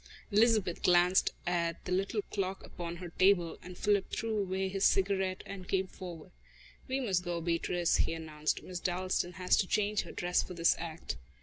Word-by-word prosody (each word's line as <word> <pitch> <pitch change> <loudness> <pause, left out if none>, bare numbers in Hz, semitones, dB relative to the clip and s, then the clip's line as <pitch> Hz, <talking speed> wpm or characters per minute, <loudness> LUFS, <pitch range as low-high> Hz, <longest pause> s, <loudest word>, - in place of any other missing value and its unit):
Elizabeth 210 -4 +3
glanced 180 +1 +4
at 170 -1 -1
the 180 - -4
little 195 +3 0
clock 195 -1 -2
upon 170 -1 -6
her 175 0 -7
table, 175 -1 +3
and 180 0 -10
Philip 205 -2 +1
threw 225 -1 -2
away 190 -1 -1
his 195 +1 -2
cigarette 190 -1 +2
and 190 -2 -8
came 190 -1 +1
forward. 175 -4 -9 0.6
"We 265 +1 -1
must 190 -9 0
go, 175 -1 -2
Beatrice," 170 +1 +1
he - - +1
announced. 155 -2 -2
"Miss 180 -1 -5
Dalstan 180 0 -1
has 180 +1 +2
to 190 - +2
change 210 +1 +1
her - - -9
dress 180 0 +1
for 180 - -8
this 170 0 +4
act." 165 - -5
185 Hz, 180 wpm, -32 LUFS, 175-195 Hz, 0.6 s, glanced